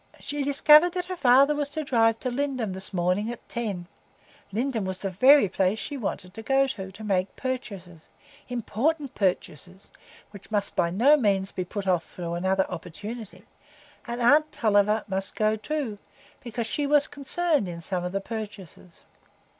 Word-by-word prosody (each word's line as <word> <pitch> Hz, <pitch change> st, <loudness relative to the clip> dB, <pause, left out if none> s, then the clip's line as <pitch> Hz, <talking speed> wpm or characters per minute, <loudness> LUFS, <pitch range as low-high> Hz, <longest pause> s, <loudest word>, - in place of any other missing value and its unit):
She 290 Hz, 0 st, -4 dB
discovered 300 Hz, +4 st, +6 dB
that 360 Hz, -1 st, -2 dB
her 370 Hz, 0 st, -5 dB
father 275 Hz, -1 st, +5 dB
was 290 Hz, -1 st, -2 dB
to 310 Hz, +2 st, -3 dB
drive 225 Hz, -5 st, +2 dB
to 255 Hz, -, -2 dB
Lindum 255 Hz, -6 st, -2 dB
this 190 Hz, +1 st, -7 dB
morning 185 Hz, +4 st, 0 dB
at 240 Hz, -, -10 dB
ten; 205 Hz, -7 st, -4 dB, 0.7 s
Lindum 230 Hz, +1 st, -1 dB
was 190 Hz, 0 st, -3 dB
the 195 Hz, -, -2 dB
very 260 Hz, +5 st, +6 dB
place 190 Hz, +2 st, 0 dB
she 220 Hz, +7 st, -5 dB
wanted 190 Hz, -7 st, -4 dB
to 225 Hz, -, -8 dB
go 270 Hz, +4 st, +3 dB
to, 195 Hz, -8 st, -6 dB
to 205 Hz, +3 st, -11 dB
make 190 Hz, -2 st, -1 dB
purchases,—important 250 Hz, -, -4 dB
purchases, 185 Hz, -1 st, -3 dB, 0.4 s
which 200 Hz, -2 st, -13 dB
must 205 Hz, -2 st, -1 dB
by 170 Hz, -, +2 dB
no 240 Hz, -, +5 dB
means 195 Hz, -6 st, +1 dB
be 185 Hz, -, -3 dB
put 200 Hz, +2 st, -5 dB
off 180 Hz, -3 st, -1 dB
to 170 Hz, -2 st, -5 dB
another 190 Hz, +2 st, +1 dB
opportunity; 205 Hz, +5 st, -8 dB, 0.6 s
and 240 Hz, +1 st, -4 dB
aunt 300 Hz, +5 st, +5 dB
Tulliver 210 Hz, -1 st, +2 dB
must 195 Hz, -1 st, -3 dB
go 215 Hz, 0 st, +2 dB
too, 225 Hz, -2 st, -4 dB, 0.4 s
because 235 Hz, -1 st, -4 dB
she 285 Hz, +5 st, -2 dB
was 290 Hz, 0 st, +4 dB
concerned 290 Hz, -, -1 dB
in 170 Hz, -1 st, -6 dB
some 175 Hz, +1 st, -3 dB
of 180 Hz, -, -3 dB
the 195 Hz, +1 st, -2 dB
purchases. 200 Hz, -6 st, -8 dB
220 Hz, 165 wpm, -26 LUFS, 190-275 Hz, 0.7 s, discovered